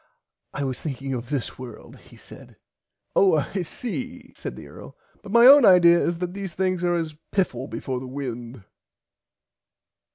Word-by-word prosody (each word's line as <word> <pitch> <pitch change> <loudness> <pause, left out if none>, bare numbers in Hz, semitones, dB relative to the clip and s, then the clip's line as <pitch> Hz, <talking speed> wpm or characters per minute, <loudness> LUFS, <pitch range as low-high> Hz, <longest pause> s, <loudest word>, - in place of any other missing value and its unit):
I 145 - -4
was 130 -2 -4
thinking 135 -2 -4
of 120 -1 -5
this 140 -5 -4
world 125 -4 -10
he - - -18
said. - - -15 0.6
Oh 190 -4 +5
I 170 +6 -2
see 250 +7 -7
said - - -7
the - - -11
Earl - - -13 0.2
but 205 - -10
my 235 +2 +6
own 280 +1 +9
idear 175 -4 +7
is 170 - -1
that 180 0 -4
these 195 -3 -6
things 185 -1 -1
are 175 0 +1
as 165 -2 -3 0.2
piffle 135 -10 -1
before 130 -2 -4
the 130 - -8
wind. 125 -4 -7
170 Hz, 165 wpm, -24 LUFS, 130-195 Hz, 0.6 s, own